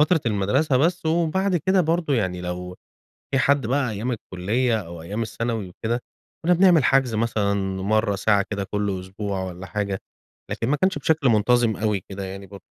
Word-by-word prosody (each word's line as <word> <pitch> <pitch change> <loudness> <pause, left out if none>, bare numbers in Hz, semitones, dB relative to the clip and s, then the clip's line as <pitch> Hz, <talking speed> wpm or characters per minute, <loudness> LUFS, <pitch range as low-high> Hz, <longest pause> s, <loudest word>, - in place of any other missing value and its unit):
فترة 160 +2 +4
المدرسة 115 +8 +2
بس 165 +4 +1
وبعد 175 +3 +1
كده 190 +4 +2
برضه 165 -2 +1
يعني 95 -6 -1
لو 90 0 -5 0.6
في 135 - +3
حد 140 -3 +2
بقى 130 -2 +1
أيام 110 +5 -3
الكلية 110 +3 -1
أو 85 -1 -9
أيام 100 +7 -4
الثانوي 115 -2 -3
وكده، 115 +6 -2 0.5
كنا 180 - +5
بنعمل 175 -4 +5
حجز 130 -3 +3
مثلًا 110 -2 +1 0.3
مرة، 110 0 +2
ساعة 100 0 +2
كده 100 -1 -1
كل 100 -2 -1
أسبوع 95 +1 -4
والّا 90 0 -7
حاجة، 100 0 -2 0.5
لكن 115 - -2
ما 150 - +2
كانش 190 +5 +1
بشكل 155 -5 +2
منتظم 115 +1 +3
أوي 105 -3 0
كده 100 0 -5
يعني 95 +1 -7
برضه. 100 +1 -12
110 Hz, 175 wpm, -23 LUFS, 100-140 Hz, 0.6 s, كنا